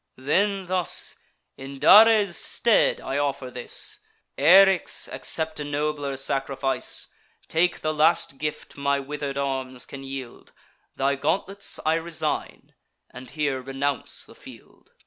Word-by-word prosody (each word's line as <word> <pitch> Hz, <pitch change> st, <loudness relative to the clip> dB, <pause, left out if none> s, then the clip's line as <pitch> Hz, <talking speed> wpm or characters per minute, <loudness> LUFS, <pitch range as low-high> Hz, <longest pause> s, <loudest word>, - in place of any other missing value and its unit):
Then, 190 Hz, +9 st, 0 dB
thus: 180 Hz, -1 st, +1 dB, 0.4 s
"In 135 Hz, +1 st, -9 dB
Dares' 205 Hz, +4 st, +6 dB
stead 235 Hz, -3 st, +2 dB
I 135 Hz, +2 st, -3 dB
offer 140 Hz, -3 st, -2 dB
this. 125 Hz, -1 st, -4 dB, 0.4 s
Eryx, 195 Hz, +1 st, +5 dB
accept 160 Hz, -1 st, +1 dB
a -, -, -3 dB
nobler 145 Hz, -1 st, -2 dB
sacrifice; 135 Hz, -1 st, -2 dB, 0.4 s
Take 175 Hz, +2 st, +1 dB
the 155 Hz, -, -1 dB
last 155 Hz, -3 st, +2 dB
gift 150 Hz, 0 st, -5 dB
my 140 Hz, 0 st, 0 dB
wither'd 140 Hz, 0 st, -5 dB
arms 130 Hz, -2 st, -3 dB
can 135 Hz, -, -9 dB
yield: 135 Hz, -2 st, -9 dB, 0.4 s
Thy 135 Hz, +1 st, +1 dB
gauntlets 195 Hz, +8 st, -2 dB
I 155 Hz, -, +3 dB
resign, 165 Hz, 0 st, -3 dB, 0.4 s
and 130 Hz, -1 st, -11 dB
here 140 Hz, -2 st, -2 dB
renounce 135 Hz, +1 st, -3 dB
the -, -, -16 dB
field." -, -, -16 dB
145 Hz, 125 wpm, -24 LUFS, 135-165 Hz, 0.4 s, Dares